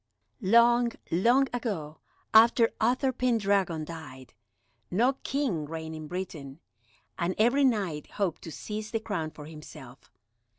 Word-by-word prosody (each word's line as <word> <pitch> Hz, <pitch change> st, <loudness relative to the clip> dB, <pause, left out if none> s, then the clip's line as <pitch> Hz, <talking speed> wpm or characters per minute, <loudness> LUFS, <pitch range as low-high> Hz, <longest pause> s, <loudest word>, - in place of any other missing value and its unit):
Long, 235 Hz, +3 st, +4 dB, 0.2 s
long 240 Hz, +11 st, +4 dB
ago, 180 Hz, -11 st, -4 dB, 0.3 s
after 230 Hz, +1 st, +6 dB
Uther 255 Hz, +4 st, +2 dB
Pendragon 200 Hz, -10 st, +1 dB
died, 145 Hz, -6 st, -10 dB, 0.6 s
no 240 Hz, +9 st, +2 dB
king 255 Hz, -, -1 dB
reigned 160 Hz, +1 st, -6 dB
in 155 Hz, -1 st, -7 dB
Britain, 160 Hz, -5 st, -6 dB, 0.6 s
and 175 Hz, +2 st, 0 dB
every 245 Hz, +6 st, +3 dB
Knight 195 Hz, -, 0 dB
hoped 195 Hz, -6 st, -2 dB
to 165 Hz, -, -8 dB
seize 215 Hz, +5 st, -6 dB
the 225 Hz, 0 st, -1 dB
crown 200 Hz, -8 st, -3 dB
for 150 Hz, -1 st, -11 dB
himself. 150 Hz, -5 st, -12 dB
195 Hz, 125 wpm, -28 LUFS, 160-235 Hz, 0.6 s, after